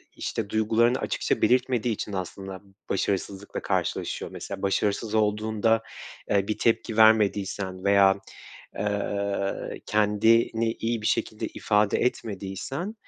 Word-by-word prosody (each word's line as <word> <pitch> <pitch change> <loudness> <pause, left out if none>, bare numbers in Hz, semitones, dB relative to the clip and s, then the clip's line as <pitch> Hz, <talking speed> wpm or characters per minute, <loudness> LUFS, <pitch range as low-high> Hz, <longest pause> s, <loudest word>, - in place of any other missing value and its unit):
işte, 110 -3 -3
duygularını 115 +3 +2
açıkça - - -1
belirtmediği 125 -2 +2
için 105 0 -5
aslında 95 0 -5 0.3
başarısızlıkla 100 +1 -2
karşılaşıyor. - - -2
Mesela 100 -1 -7
başarısız 105 +2 0
olduğunda, 110 +1 +1 0.5
eee, 100 -1 +2
bir 110 - -1
tepki 115 -1 0
vermediysen 100 -3 +3
veya, 100 -1 +5 0.6
eee, 100 -1 -2
kendini 110 +2 +3
iyi 115 -1 -2
bir - - -2
şekilde 110 +1 -1
ifade 105 -1 +1
etmediysen, 120 - -3
105 Hz, 105 wpm, -26 LUFS, 100-115 Hz, 0.6 s, veya